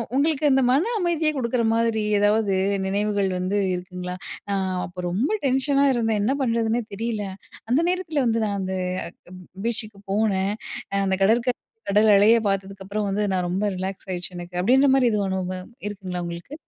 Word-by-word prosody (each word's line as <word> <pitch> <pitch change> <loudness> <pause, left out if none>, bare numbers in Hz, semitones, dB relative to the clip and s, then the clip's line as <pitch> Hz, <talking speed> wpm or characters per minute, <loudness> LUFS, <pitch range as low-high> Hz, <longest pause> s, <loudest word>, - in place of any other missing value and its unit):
உங்களுக்கு 300 +1 +2
அந்த 270 -1 +4
மன 290 - +3
அமைதிய 335 -4 +1
குடுக்குற 245 -2 0
மாதிரி 230 -1 +1 0.2
ஏதாவது 205 0 +2 0.3
நினைவுகள் 200 0 0
வந்து 185 +3 -1 0.2
இருக்குங்களா? 180 0 -5 0.4
அ - - +1 0.3
"அப்போ 180 0 -7
ரொம்ப 205 +11 0 0.2
டென்ஷனா 275 +1 +2
இருந்தேன். 225 -3 +1
என்ன 245 +6 +2
பண்றதுன்னே 230 -1 +1
தெரியல. 215 0 -2 0.5
அந்த 270 +6 +4
நேரத்துல 360 -6 0
வந்து 230 -1 +1
நான் 200 -1 -1
அந்த 190 0 -3 0.6
அக் 185 - -10
ப் - - -13 0.2
பீச்சுக்கு 215 -3 -1
போனேன். 200 -1 +1 0.5
அந்த 190 -1 +1
கடற்கரை 235 +4 +2 0.3
கடல் 210 +2 +5
அலைய 220 +4 +6
பாத்ததுக்கப்புறம் 195 +1 -3
வந்து, 200 +2 0
நான் 180 -1 0
ரொம்ப 190 +4 -1
ரிலாக்ஸ் 190 +1 -5
ஆயிருச்சு 180 0 -3
எனக்கு" 175 0 -5
அப்டின்ற 265 +7 +5
மாரி 250 -3 +4
எதுவும் 205 -2 0
அனுபவம் 185 0 -4 0.2
இருக்குங்களா? 185 -3 -5
உங்களுக்கு! 170 +11 -7
210 Hz, 160 wpm, -24 LUFS, 190-245 Hz, 0.6 s, அலைய